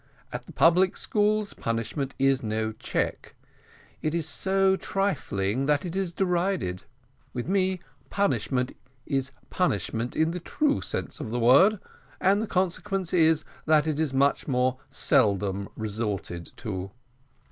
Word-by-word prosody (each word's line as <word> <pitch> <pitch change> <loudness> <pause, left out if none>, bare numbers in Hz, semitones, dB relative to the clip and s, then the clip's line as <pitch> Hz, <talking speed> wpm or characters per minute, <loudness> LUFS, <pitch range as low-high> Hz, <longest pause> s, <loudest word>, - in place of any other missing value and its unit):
At - - -6
the - - -10
public 180 +3 +4
schools, 210 0 +1
punishment 115 +4 -3
is 135 -1 +3
no 110 0 -1
check; 110 - -3 0.7
it 155 +1 -1
is 165 -2 -1
so 190 +5 +2
trifling 135 - -1
that 150 +3 +2
it 175 0 -4
is 190 -3 -1
derided: 175 - -1 0.5
with 120 +2 -3
me 190 -1 +1 0.3
punishment 135 -10 0 0.3
is 135 -2 -1 0.2
punishment 115 - -1
in 160 +1 +2
the 180 - -4
true 290 - 0
sense 95 - -4
of - - -5
the 120 +2 -2
word, 140 - +6 0.4
and 195 +3 +3
the 220 - -2
consequence 185 0 -1
is, 160 -3 +4 0.2
that 155 -1 +5
it 155 -2 -1
is 160 -3 +1
much 140 +1 +2
more 130 -1 +1
seldom 100 -8 +2
resorted 105 -5 -3
to." 95 -5 -4
150 Hz, 135 wpm, -27 LUFS, 115-185 Hz, 0.7 s, word